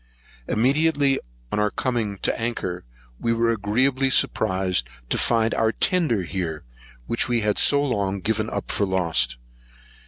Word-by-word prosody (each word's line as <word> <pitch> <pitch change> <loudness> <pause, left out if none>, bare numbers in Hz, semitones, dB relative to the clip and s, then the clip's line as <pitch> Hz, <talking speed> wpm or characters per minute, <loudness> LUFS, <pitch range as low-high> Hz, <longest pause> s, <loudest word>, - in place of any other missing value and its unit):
Immediately 140 +3 +2 0.3
on - - 0
our 105 0 +2
coming 110 -4 -2
to - - +1
anchor, 105 -6 -3 0.4
we 115 - +1
were 115 0 +2
agreeably 125 +6 +1
surprised 95 - +1 0.2
to - - 0
find 115 -1 +2
our 110 -1 +2
tender 150 - +1
here 85 -3 -4 0.4
which 115 +3 0
we 120 -1 +1
had 105 -1 +1
so 145 0 +4
long 100 -7 -1
given 110 +2 -1
up - - -4
for 100 - 0
lost. 80 -10 0
110 Hz, 145 wpm, -23 LUFS, 95-125 Hz, 0.4 s, so